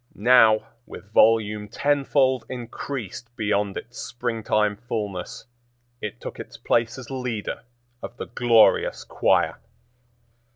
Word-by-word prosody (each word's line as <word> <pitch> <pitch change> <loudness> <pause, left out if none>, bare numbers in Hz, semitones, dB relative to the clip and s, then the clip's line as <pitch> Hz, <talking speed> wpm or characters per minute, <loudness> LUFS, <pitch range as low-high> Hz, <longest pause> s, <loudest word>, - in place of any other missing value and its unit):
Now, 110 -1 +5 0.2
with 105 +2 -12
volume 105 -2 +3
tenfold 135 0 +1
increased 120 -2 -6
beyond 105 -2 -1
its 120 - -9
springtime 110 -3 -1
fullness, 105 -6 -5 0.6
it 105 - -6
took - - -8
its - - -9
place 115 +1 0
as 130 0 -9
leader 125 -5 -4 0.4
of 120 - -8
the - - -5
glorious 115 -2 +3
choir. - - +1
115 Hz, 110 wpm, -24 LUFS, 105-125 Hz, 0.6 s, Now